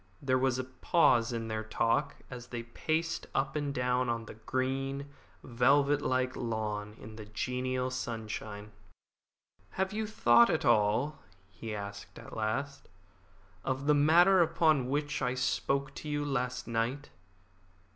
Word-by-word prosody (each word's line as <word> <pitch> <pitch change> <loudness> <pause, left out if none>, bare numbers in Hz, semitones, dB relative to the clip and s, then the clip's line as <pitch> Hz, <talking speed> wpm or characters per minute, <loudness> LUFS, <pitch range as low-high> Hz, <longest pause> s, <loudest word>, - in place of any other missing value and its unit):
There 130 -2 +1
was 130 -1 +1
a 130 - -2
pause 130 -2 +2
in 115 -1 -3
their 110 0 -3
talk 115 +6 0 0.2
as 125 -1 -8
they 120 -1 -5
paced 160 +7 -2
up 135 +2 0
and 145 -1 -1
down 125 -1 0
on 115 -1 -2
the - - -9
green, 135 +4 -3 0.3
velvet 140 +4 +3
like 130 0 0
lawn 105 -3 -3
in 110 +1 -11
the 110 - -8
genial 125 +4 -2
sunshine. 110 -4 -5 1.1
"Have 190 +2 0
you 215 0 -2
thought 120 - +5
at - - 0
all," 120 +6 +2 0.3
he 110 -2 -6
asked 100 0 -8
at - - -10
last, 135 +6 -3 0.7
"of 135 +1 -2
the 150 - +5
matter 170 +6 +6
upon 155 -5 +2
which 145 +1 -1
I 125 +1 0
spoke 135 +1 0
to 150 - -7
you 145 0 -1
last 125 -2 -2
night?" 120 +5 -2
130 Hz, 145 wpm, -31 LUFS, 115-140 Hz, 1.1 s, matter